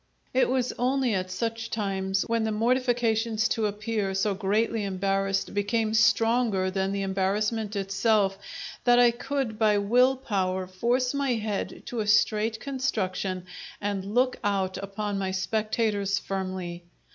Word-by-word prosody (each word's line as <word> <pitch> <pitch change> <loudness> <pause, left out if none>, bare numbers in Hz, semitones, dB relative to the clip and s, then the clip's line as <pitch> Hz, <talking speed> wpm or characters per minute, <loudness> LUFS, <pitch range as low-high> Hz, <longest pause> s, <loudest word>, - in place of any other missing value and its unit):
It 260 0 +3
was 255 -1 0
only 255 -1 +1
at 185 -1 -1
such 230 +4 -3
times 195 -2 -1
when 230 -1 0
the 220 - 0
mortifications 230 -1 +1
to 220 -2 +1
appear 210 -1 -2
so 200 +1 +1
greatly 210 +3 0
embarrassed 195 0 -1
became 215 +2 0
stronger 225 -3 +3
than 190 0 -1
the 200 0 -1
embarrassment 205 +3 -1
itself 195 0 +1 0.4
that 245 -1 +5
I 245 -1 +6
could 245 -2 -3
by 215 -2 +4
will 245 +6 +4
power 190 -7 -1
force 240 +8 0
my 280 -2 +1
head 215 -2 -3
to 240 - -4
a 210 - -1
straight 215 +1 +2
construction 195 -9 -2 0.3
and 200 0 -3
look 255 +1 +3
out 195 -2 0
upon 200 +1 -3
my 190 -1 -1
spectators 205 +1 0
firmly. 185 -3 -4
210 Hz, 140 wpm, -27 LUFS, 195-230 Hz, 0.4 s, I